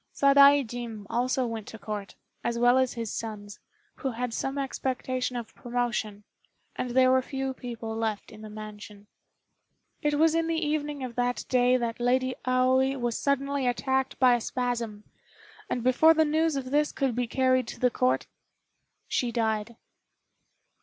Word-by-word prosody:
Sadaijin 275 -6 +4
also 250 +2 +1
went 225 -3 -5
to 225 - -8
Court, 205 -1 -6 0.3
as 235 0 -1
well 245 +2 +5
as 260 -1 +1
his 230 -3 -4
sons, 205 -2 -6 0.4
who 270 - -2
had 245 -1 -3
some 270 +3 -2
expectation 255 -2 -2
of 230 -2 -6
promotion, 235 -4 -3 0.5
and 250 - -3
there 255 +1 +4
were 260 0 +4
few 270 0 -3
people 230 -3 -6
left 220 -2 -3
in 215 - -12
the 215 - -9
mansion. 210 -1 -10 1.0
It 295 0 +1
was 320 +2 +4
in 330 0 +1
the 330 - 0
evening 295 -3 -2
of 250 -2 -5
that 245 0 0
day 250 0 +4
that 235 -1 -3
Lady 255 +1 +1
Aoi 260 +1 +3
was 240 -2 -1
suddenly 280 -1 0
attacked 265 +1 0
by 255 -2 +5
a 240 - +1
spasm, 235 -4 -3 0.7
and 245 - -2
before 315 +6 +5
the 315 0 +4
news 315 +1 +1
of 260 -2 -4
this 295 +1 +2
could 270 -3 -1
be 245 +1 -1
carried 255 0 +2
to - - -8
the 250 -1 +3
Court, 255 +2 +1 0.8
she 245 -2 0
died. 220 0 -1
250 Hz, 160 wpm, -27 LUFS, 230-265 Hz, 1.0 s, well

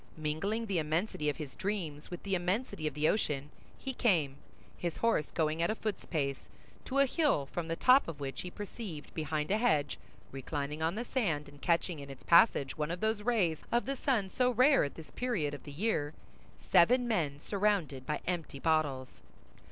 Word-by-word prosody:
Mingling 160 +9 -1
the 195 -5 0
immensity 155 0 -1
of 145 - -3
his 145 -4 -7
dreams 175 -8 -3
with 175 - -7
the 195 - -2
immensity 185 -1 -1
of 145 - -4
the 150 +1 +2
ocean, 150 -8 0 0.3
he 265 - -5
came, 160 - +2 0.4
his 175 -2 -3
horse 230 -10 +1
going 160 0 0
at 170 - +2
a 215 - 0
foot's 215 -2 -4
pace, 140 -5 -2 0.4
to 270 - -2
a 275 - +6
hill 280 - +1
from 160 +4 -4
the 165 - -1
top 255 +9 +5
of 160 -3 -6
which 135 -1 -4
he 180 - -6
perceived 200 -5 -7
behind 155 0 -2
a 210 - +3
hedge, 155 -11 +1 0.3
reclining 145 +2 -4
on 165 +3 +1
the 235 +3 -3
sand 170 - -1
and 145 0 -15
catching 170 -1 +1
in 140 -1 -9
its 135 - -10
passage 170 -6 +5
one 150 -1 -2
of 175 +1 -3
those 220 0 0
rays 205 -9 +1
of 240 +1 +2
the 275 - -2
sun 235 -8 0
so 250 -1 +2
rare 255 +4 +5
at 140 - -3
this 160 - -11
period 205 -13 -1
of 145 - -8
the 145 - -8
year, 155 -3 -1 0.6
seven 245 +8 +5
men 160 -11 0
surrounded 190 -8 0
by 150 - -1
empty 170 -5 -3
bottles. 145 -4 0
165 Hz, 195 wpm, -32 LUFS, 150-215 Hz, 0.6 s, a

